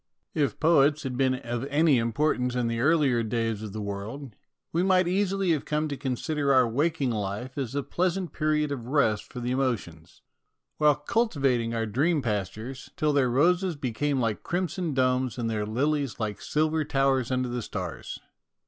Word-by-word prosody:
If 145 -3 0
poets 155 -2 +4
had 130 -2 -3
been 130 0 +2
of 120 -1 -4
any 145 -1 +3
importance 125 +2 0
in 125 -1 0
the 115 0 -2
earlier 140 -3 +3
days 115 -1 -1
of 110 -2 -6
the 105 +1 -5
world, 105 +5 -6 0.4
we 170 - +2
might 185 -1 +3
easily 195 0 +1
have 155 -4 +1
come 150 +1 -1
to 140 - -3
consider 140 +2 -1
our 130 -2 +5
waking 145 +2 0
life 105 +4 -4
as 135 -2 -3
a 140 - 0
pleasant 180 +2 -1
period 150 -1 0
of 120 -4 -5
rest 125 -7 +1
for 125 - -6
the 120 0 -2
emotions, 110 -11 -3 0.5
while 150 -1 +4
cultivating 140 - 0
our 115 0 0
dream 145 +7 +1
pastures, 110 +4 -4
till 150 -1 +1
their 135 -3 +3
roses 175 +7 +2
became 140 +1 -1
like 115 -4 -1
crimson 175 -3 -2
domes 130 -1 +1
and 115 -2 -1
their 105 -1 -2
lilies 140 +3 -1
like 105 -3 -3
silver 155 +1 +1
towers 135 -3 +1
under 130 -1 0
the 120 0 -3
stars. 90 -6 -5
135 Hz, 175 wpm, -27 LUFS, 115-150 Hz, 0.5 s, our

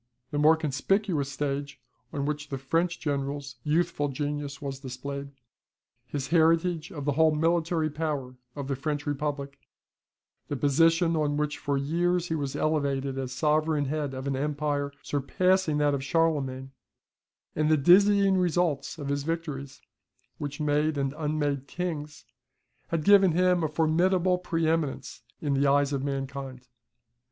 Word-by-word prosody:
The 145 - -1
more 155 +2 +6
conspicuous 155 +1 0
stage, 140 0 -3 0.3
on 140 -3 -2
which 150 0 -3
the 135 - -3
French 165 +6 0
general's 140 -2 -3
youthful 150 -1 +1
genius 145 0 -4
was 135 -3 -5
displayed, 140 +2 -6 0.8
his 135 -2 -4
heritage 165 +1 +2
of 145 -6 -6
the 145 - +2
whole 155 +2 +3
military 165 0 +1
power 150 -4 -3 0.2
of 140 -2 -5
the 135 - -1
French 145 +2 -3
Republic, 140 -1 -3 0.9
the 145 - -3
position 165 +4 +3
on 150 -2 0
which 150 0 -1
for 140 -1 -1
years 175 +5 0
he - - 0
was 140 -2 -3
elevated 140 -3 0
as 130 -1 -4
sovereign 150 +2 +1
head 145 -1 -2
of 130 +1 -5
an 140 -1 -1
empire 145 0 -1
surpassing 165 +3 +1
that 145 -1 +2
of 135 -1 -2
Charlemagne, 135 -4 0 0.8
and 155 0 +1
the 155 - +5
dazzling 195 +5 +5
results 175 -5 0
of 145 -2 -5
his 140 0 0
victories, 145 -4 -5 0.6
which 145 0 -5
made 150 0 +1
and 135 -1 -1
unmade 150 -3 -1
kings, 150 -5 -5 0.6
had 165 -2 -1
given 195 -2 +6
him 180 0 +3
a - - +2
formidable 175 +4 +2
pre 165 -2 -1
eminence 160 -4 -2 0.2
in 145 -2 0
the 140 +1 +2
eyes 140 0 +3
of 135 -1 -1
mankind. 135 -2 -5
150 Hz, 145 wpm, -27 LUFS, 140-165 Hz, 0.9 s, more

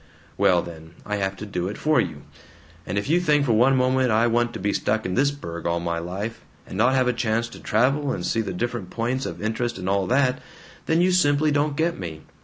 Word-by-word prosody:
"Well 90 -2 +3
then, 80 -1 -11
I 105 0 -2
have 95 -1 -1
to 100 - -7
do 90 -3 -3
it 100 - -5
for 155 0 +3
you. 75 -6 -5 0.6
And 100 - -2
if 100 - -1
you 165 +4 +3
think 150 -5 +2
for 125 - +1
one 125 +5 +4
moment 130 0 +2
I 110 +1 +3
want 120 0 +1
to - - -6
be 100 - 0
stuck 110 +1 0
in 95 - -2
this 140 +6 +3
burg 85 -14 -6
all 85 0 0
my 85 0 -2
life, 95 +7 -5 0.2
and - - -9
not 120 +6 +3
have 130 -1 +2
a 125 - +2
chance 115 0 0
to - - -11
travel 135 +6 +1
and - - -3
see 115 - +1
the 110 - -4
different 115 0 -3
points 125 +3 -2
of - - -7
interest 115 +1 -2
and 95 0 -5
all 100 -1 +1
that, 130 0 +2 0.5
then 160 +1 +3
you 185 +1 +3
simply 155 -4 +3
don't 145 0 0
get 165 +1 0
me. 80 -4 -6
115 Hz, 240 wpm, -24 LUFS, 95-135 Hz, 0.6 s, one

